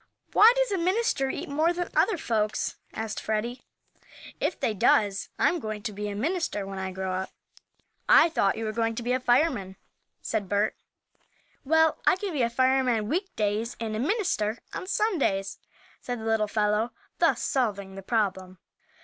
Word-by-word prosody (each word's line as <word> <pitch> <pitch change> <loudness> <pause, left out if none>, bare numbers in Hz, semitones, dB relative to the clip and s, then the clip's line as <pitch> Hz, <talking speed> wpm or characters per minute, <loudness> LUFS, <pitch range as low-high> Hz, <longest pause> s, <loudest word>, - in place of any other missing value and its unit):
"Why, 440 +3 +8
does - - +1
a 390 - 0
minister 365 - +1
eat - - -4
more 310 +4 +1
than 350 0 -3
other 425 - +3
folks?" 215 -6 -1 0.2
asked 220 -1 -4
Freddie. 225 +3 -2 0.8
"If 345 - -1
they 220 - 0
does, 200 0 +2
I'm 345 - +2
going 215 -5 -5
to 210 - -4
be 210 +1 -4
a 200 - -5
minister 295 - -1
when 195 0 -6
I 190 0 -3
grow 190 0 -3
up." 190 +1 -3 0.8
"I - - +8
thought 210 - +1
you 225 - -3
were 215 - -1
going 230 0 -1
to 235 - -4
be 245 - -1
a 255 - +1
fireman," 245 - +1 0.4
said 200 -3 -3
Bert. 205 +1 +1 0.9
"Well, 320 +2 +3
I - - +6
can 385 -1 -4
be 285 - 0
a 235 - +2
fireman 255 -3 +2
week 370 +5 -2
days 215 +2 -1
and 220 -2 -3
a - - -2
minister 260 - 0 0.2
on 370 - -5
Sundays," 280 - 0 0.4
said 245 -1 -5
the 220 - -7
little 220 -1 +1
fellow, 210 +2 0 0.3
thus - - +2
solving 200 -7 -1
the 195 - -8
problem. 190 -3 -1
225 Hz, 175 wpm, -27 LUFS, 205-310 Hz, 0.9 s, Why